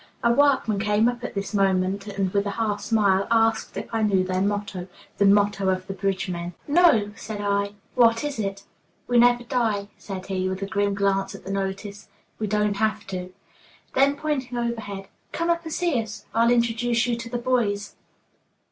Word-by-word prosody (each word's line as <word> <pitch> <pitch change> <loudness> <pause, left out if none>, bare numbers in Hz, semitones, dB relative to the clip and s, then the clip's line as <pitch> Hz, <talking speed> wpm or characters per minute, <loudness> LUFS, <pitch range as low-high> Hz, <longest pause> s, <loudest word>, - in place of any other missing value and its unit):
A 235 0 +4
workman 265 -6 +3
came 210 +2 +2
up 245 0 -2
at 245 - -5
this 200 +2 -3
moment, 195 0 +1
and, 195 -2 -2
with 200 0 +1
a 200 - -4
half 210 -3 -1
smile, 200 -4 +2
asked 225 -3 +2
if 205 - -3
I 225 - +1
knew 200 -3 +3
their 185 0 -1
motto, 200 -2 -2 0.3
the 200 - +5
motto 200 -1 +3
of 185 0 -1
the 195 - -5
bridge 195 0 -1
men. 175 -1 -5
"No," 290 -10 +4
said 220 -2 -6
I; 200 0 0 0.2
"what 230 -1 +4
is 290 -5 -3
it?" 195 -1 -3 0.4
"'We 245 -1 +3
never 240 0 +5
die,'" 225 -5 -1
said 190 -2 -7
he, 185 -1 -1
with 190 +1 -3
a - - 0
grim 200 -1 0
glance 195 0 0
at - - -12
the 195 - -4
notice; 195 +1 -4 0.3
"we 215 - -1
don't 210 0 +1
have 220 0 0
to." 180 0 -4 0.6
Then, 275 +2 +4
pointing 280 -5 -2
overhead: 220 -5 -4 0.3
"Come 335 +1 +1
up 335 0 -1
and 320 - -5
see 325 -8 +1
us. 220 -1 -9
I'll 230 +1 +4
introduce 235 0 +2
you 240 -1 0
to 235 0 -7
the 245 - -2
boys." 230 -5 0
205 Hz, 190 wpm, -24 LUFS, 195-235 Hz, 0.6 s, the